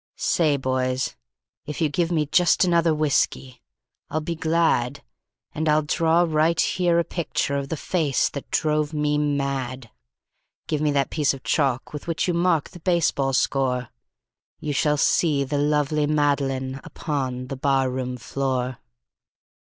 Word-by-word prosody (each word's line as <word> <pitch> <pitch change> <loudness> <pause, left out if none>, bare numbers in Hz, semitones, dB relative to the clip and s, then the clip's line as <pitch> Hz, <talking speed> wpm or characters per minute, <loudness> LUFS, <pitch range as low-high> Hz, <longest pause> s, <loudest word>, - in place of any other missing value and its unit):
"Say, 165 - +1
boys, 130 -1 -1 0.5
if 150 - -5
you 160 - +2
give 170 +3 -1
me 155 -3 +1
just 175 +5 +3
another 170 -2 +3
whiskey 140 -4 0 0.5
I'll 155 - -1
be 165 +2 -3
glad, 160 -5 +1 0.5
And 155 0 -1
I'll 155 0 +3
draw 165 +3 +2
right 160 +1 +2
here 175 -2 +2
a 170 - +3
picture 160 -4 -2
of 140 -1 -3
the 160 - -3
face 150 -5 +1
that 140 - -8
drove 150 0 0
me 150 0 +1
mad. 135 -4 -2 0.7
Give 150 -1 -2
me 155 - +2
that 140 -1 0
piece 145 -3 +1
of 130 - -13
chalk 135 -3 0
with 150 - -7
which 165 +1 -1
you 175 - +1
mark 170 -3 +1
the 175 - -11
baseball 160 -6 +1
score 130 -2 0 0.7
You 150 -2 -3
shall 150 +2 +2
see 145 -1 +2
the 140 +1 -2
lovely 150 0 +1
Madeline 140 -3 0
upon 130 -5 -3
the 135 - -3
barroon 130 -2 0
floor." 130 0 -2
150 Hz, 150 wpm, -24 LUFS, 135-160 Hz, 0.7 s, just